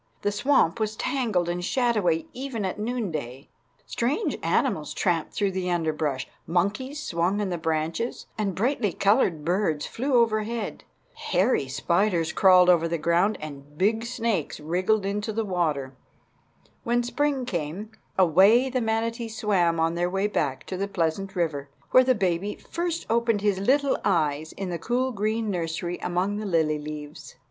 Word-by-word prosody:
The 205 - +1
swamp 235 - +2
was 215 0 -1
tangled 215 -10 0
and 175 +1 -2
shadowy 210 -8 +1
even 250 -5 -4
at 185 - -3
noonday. 165 - -4 0.4
Strange 290 - -1
animals 165 - 0
tramped 170 -5 0
through 200 -2 +1
the 185 -1 -2
underbrush; 155 -6 -1 0.2
monkeys 210 - -1
swung 180 - 0
on 205 -2 -1
the 175 - -1
branches, 160 +7 -2
and 200 -4 -2
brightly 220 - 0
colored 195 - +2
birds 175 -4 0
flew 265 +3 -1
overhead. 225 -1 0 0.3
Hairy 185 - +1
spiders 170 +4 +1
crawled 185 -2 +6
over 170 -2 +4
the 170 0 -1
ground, 170 +6 +2
and 145 -1 -9
big 220 +5 +2
snakes 230 - -2
wriggled 185 +7 0
into 205 +2 -2
the 220 +1 -2
water. 155 -8 -1 0.9
When 240 +1 +1
spring 275 +1 0
came, 180 +1 -4 0.3
away 195 - +5
the 255 -1 0
manatees 225 0 -2
swam 175 -6 +2
on 165 0 +2
their 175 +1 0
way 195 +2 0
back 145 -10 -1
to 185 - -5
the 200 +2 -1
pleasant 190 +2 -2
river, 150 -5 -1 0.2
where 255 - +7
the 255 0 +3
baby 190 0 -1
first 340 0 -4
opened 230 -2 +1
his 205 -2 +1
little 275 +7 +2
eyes 160 -5 +1
in 195 -2 -5
the 170 - -3
cool 250 +6 0
green 215 0 -1
nursery 175 0 -3
among 185 +3 -1
the 215 - -4
lily 160 -4 +1
leaves. 150 0 -8
195 Hz, 155 wpm, -26 LUFS, 165-225 Hz, 0.9 s, where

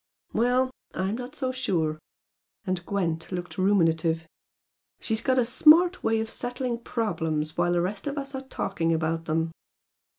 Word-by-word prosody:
"Well! 250 +3 +2 0.2
I'm 190 +4 -1
not 250 +4 -7
so 260 -3 -1
sure!" 165 -12 0 0.7
and 185 -3 -2
Gwent 170 -5 -1
looked 180 0 -5
ruminative 165 -4 +2 0.7
"She's 220 -1 -1
got 260 -1 +2
a 250 - +4
smart 330 +9 +5
way 225 0 +2
of 220 - -2
settling 245 -1 -3
problems 160 -11 -2
while 175 0 +2
the 175 - +2
rest 195 +8 -3
of 285 +1 -3
us 275 -1 -4
are 265 - -3
talking 180 -10 -1
about 165 +1 -1
them." 160 +1 0
200 Hz, 155 wpm, -27 LUFS, 165-250 Hz, 0.7 s, smart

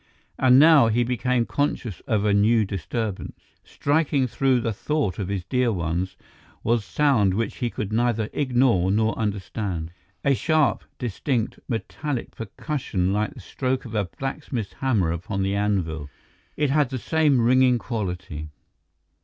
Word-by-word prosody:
And 130 -1 +6
now 150 -3 +7
he 115 +2 +2
became 125 0 0
conscious 125 - -2
of 105 -2 +1
a 105 - +3
new 110 +2 +4
disturbance. 100 +2 -4 0.2
Striking 145 -2 +1
through 130 +1 +2
the 115 -1 -1
thought 145 - -1
of 95 - -2
his 100 -2 -2
dear 125 -2 +1
ones 90 0 -2 0.5
was 115 -1 +1
sound 105 - +2
which 115 0 -2
he 120 - -1
could 105 -2 -4
neither 115 -2 +1
ignore 125 -9 +2
nor 110 +3 +2
understand, 100 -5 -3 0.3
a 140 - +4
sharp, 155 +2 +2
distinct, 120 0 -2
metallic 130 +3 -4
percussion 105 - -2
like 105 +1 -1
the - - -10
stroke 130 -1 -2
of 115 - -8
a 105 -2 +1
blacksmith's 135 -6 -4
hammer 110 -11 +1
upon 90 +3 -3
the 95 +1 0
anvil; 90 -8 -1 0.5
it 145 -2 +1
had 145 -3 +2
the 130 - -3
same 150 0 +2
ringing 125 +1 +4
quality. 90 - -4
115 Hz, 145 wpm, -24 LUFS, 100-130 Hz, 0.5 s, now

